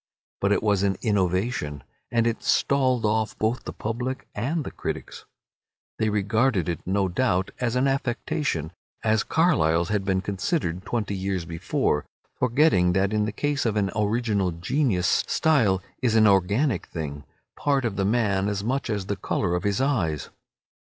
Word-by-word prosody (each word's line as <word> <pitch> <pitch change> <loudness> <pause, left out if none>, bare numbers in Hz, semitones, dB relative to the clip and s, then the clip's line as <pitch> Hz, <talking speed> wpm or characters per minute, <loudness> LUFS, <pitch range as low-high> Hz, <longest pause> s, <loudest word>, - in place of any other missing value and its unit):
But 100 - +1
it 105 - +2
was 100 -3 +2
an 100 -2 +1
innovation, 95 - 0 0.3
and 115 -1 +2
it 115 -1 0
stalled 130 -4 +2
off 110 0 0
both 110 +3 -1
the - - -4
public 125 +4 -4
and 145 +9 -1
the - - -6
critics. - - -6 0.7
They 110 - +2
regarded 105 -1 +1
it, 85 - -2
no 95 +1 +1
doubt, 95 -1 0
as 120 -1 0
an 130 +2 +2
affectation, 135 - -1 0.3
as 110 -1 +3
Carlyle's 85 - +2
had 105 -2 0
been 95 -1 0
considered 95 - -2
twenty 110 -3 -2
years 95 -2 -2
before, 80 -2 -1 0.3
forgetting 125 - +3
that 95 +2 +1
in 105 -1 +2
the 105 - -2
case 145 +6 -1
of 115 -3 0
an 100 -3 +1
original 105 -2 +1
genius 90 - +1
style 110 - +2 0.2
is 115 -3 +2
an 110 -1 +6
organic 100 - +2
thing, 75 -3 -5 0.3
part 140 -3 +1
of 110 -4 -1
the 100 - 0
man 100 -2 +1
as 100 -1 -2
much 130 +3 -1
as 100 -3 -2
the 100 - -2
colour 90 -2 -1
of 90 - 0
his 100 -1 0
eyes. 110 - 0
105 Hz, 165 wpm, -25 LUFS, 95-120 Hz, 0.7 s, an